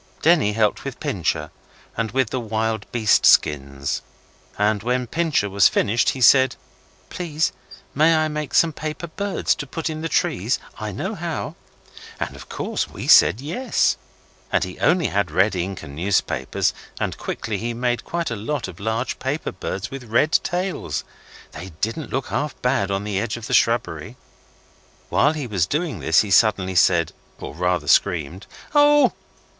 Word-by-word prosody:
Denny 155 -10 +4
helped 105 -1 +1
with - - -6
Pincher, - - -2 0.4
and 115 -1 -1
with 130 -2 0
the 130 - -1
wild 110 -1 -2
beast 110 -4 +3
skins, 70 -1 +2 0.6
and 105 0 +1
when 125 +3 0
Pincher 160 -5 0
was 100 0 +5
finished 115 +4 +2
he 130 - -3
said 130 +1 +6 0.6
'Please, 165 -3 -1 0.4
may 160 +3 +4
I 155 0 +2
make 150 -2 -4
some 165 -2 +4
paper 155 +3 -5
birds 200 +4 -1
to 145 - -7
put 160 +4 -3
in 155 0 -5
the 165 - -3
trees? - - +1 0.2
I - - -4
know - - -4
how.' - - -4 0.7
And - - -4
of - - -12
course - - -3
we - - -7
said 115 - +6
'Yes', 240 - +1 0.6
and - - +2
he - - -7
only 180 -3 +3
had 100 -3 0
red 95 +6 +2
ink 90 +1 -3
and 70 - -9
newspapers, 90 +4 0 0.3
and - - -2
quickly 105 -3 -4
he 120 +1 -2
made 120 0 -1
quite 170 -5 -3
a - - -1
lot 115 +7 -3
of 90 -1 -11
large 110 +4 -2
paper 135 +4 -2
birds 95 +2 -5
with 135 -2 -7
red 120 +7 +2
tails. 180 +2 -1 0.5
They 90 0 -9
didn't 115 +8 -2
look 135 - -3
half 145 -2 -3
bad 125 -6 +1
on 100 0 -1
the 105 -2 -2
edge 115 +2 -2
of 115 - -8
the - - -4
shrubbery. 115 -3 +1 0.9
While 145 - +3
he 150 -4 -4
was 95 -7 0
doing 155 - -2
this - - +4
he 105 - -4
suddenly 95 -2 +3
said, 85 -2 +3 0.3
or - - -7
rather 90 -1 -1
screamed, 90 +2 +1 0.3
'Oh? 290 0 +5
115 Hz, 170 wpm, -22 LUFS, 100-150 Hz, 0.9 s, said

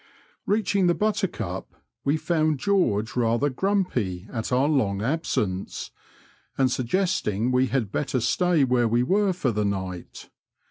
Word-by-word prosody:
Eeaching 200 -3 +2
the 175 - +3
Buttercup, 195 - -2 0.3
we 145 +3 +2
found 155 -2 +1
George 130 - +1
rather 120 +4 +1
grumpy 125 - -1
at 115 +1 -3
our 130 +3 +3
long 105 -10 +1
absence, 110 - -2 0.7
and 130 -2 +3
suggesting 125 - 0
we 130 +1 +3
had 120 -5 -1
better 135 0 -1
stay 175 +5 +2
where 125 -2 +2
we 120 +2 +2
were 195 +7 +2
for 170 -9 -1
the 105 -1 -1
night. 95 -3 -5
130 Hz, 135 wpm, -25 LUFS, 110-175 Hz, 0.7 s, the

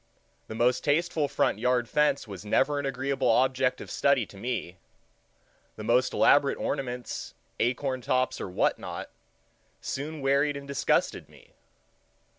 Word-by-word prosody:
The 110 - -7
most 120 +2 +2
tasteful 155 0 +1
front - - 0
yard 125 -1 +1
fence 150 -3 +1
was 100 -2 -8
never 135 +7 +1
an 140 - -2
agreeable 135 -1 -1
object 130 +2 +2
of - - -9
study 140 -5 +2
to 100 - -16
me; 100 -4 -4 1.0
the 110 - -8
most 120 +3 +2
elaborate 140 0 +4
ornaments, 125 -2 -4 0.2
acorn 130 +2 0
tops, 130 +1 0
or - - -4
what 90 - +1
not, - - -7 0.7
soon 150 +2 -5
wearied 140 +1 +2
and 140 0 -9
disgusted 140 -1 0
me. - - -19
130 Hz, 140 wpm, -28 LUFS, 125-140 Hz, 1.0 s, elaborate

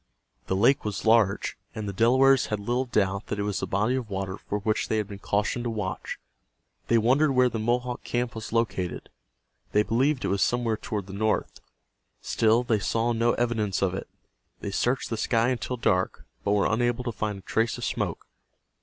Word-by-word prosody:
The 95 - 0
lake 120 +8 +4
was 105 0 -4
large, 110 -3 +3 0.2
and 110 -1 -4
the 100 - -3
Delawares 130 +6 +4
had 105 - -2
little 120 +5 -1
doubt 100 -4 0
that 105 - -3
it 100 - -1
was 105 -1 -1
the - - -3
body 105 +6 +1
of 130 -4 -2
water 95 -1 -3
for 105 - -4
which 105 +1 -1
they 110 - 0
had 105 -2 -1
been 100 -2 -8
cautioned 105 +5 -1
to - - 0
watch. 105 -4 -4 0.7
They 115 - +4
wondered 135 +6 +3
where 125 -1 +4
the 115 - -3
Mohawk 120 +2 -1
camp 120 -1 -2
was 110 0 -7
located. 110 -7 -1 0.6
They 105 - +4
believed 130 +6 +1
it - - 0
was 100 0 0
somewhere 120 -2 +1
toward 105 -3 -4
the 95 - -10
north. 110 +2 -1 0.6
Still 115 +2 +2
they 115 -3 +1
saw 115 +3 0
no 115 +1 +2
evidence 110 -5 0
of 95 -2 +1
it. 95 - -5 0.5
They 100 - -5
searched 120 +6 0
the 115 - -1
sky 115 +2 +2
until 125 0 -2
dark, 95 -5 0 0.2
but 100 - +1
were 100 -1 +3
unable 120 +1 +1
to 120 - -2
find 105 -2 -3
a - - -11
trace 115 +4 0
of - - -4
smoke. - - -2
110 Hz, 200 wpm, -26 LUFS, 100-120 Hz, 0.7 s, lake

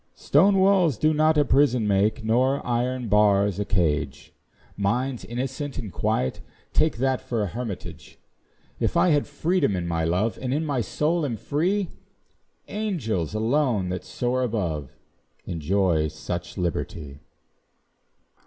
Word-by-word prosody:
Stone 200 0 +4
walls 190 - +4
do 155 0 +2
not 155 +1 +3
a 145 - +4
prison 125 -5 +3
make, 105 +4 +1
Nor 130 +5 +1
iron 125 0 -1
bars 100 -1 +3
a 105 - -1
cage; 80 -7 -1 0.4
Minds 120 +6 -1
innocent 130 +4 -4
and 105 -8 -6
quiet 65 - -1 0.3
take 155 -5 +2
That 130 +1 0
for 115 -3 -2
an 100 - -2
hermitage. 115 -2 -7 0.6
If - - 0
I 180 - +4
have 145 -3 +2
freedom 155 - 0
in 90 -1 -3
my 85 -1 -1
love, 90 +7 0
And 130 +1 -1
in 160 +2 -1
my 140 -5 0
soul 160 +8 0
am 125 -6 -2
free, 180 - 0 0.8
Angels 120 - -2
alone, 115 -4 +1
that 90 0 -4
soar 120 +7 -1
above, 90 - -2 0.5
Enjoy 85 -1 +1
such 85 +4 -6
liberty. 80 -5 -4
115 Hz, 135 wpm, -25 LUFS, 95-145 Hz, 0.8 s, Stone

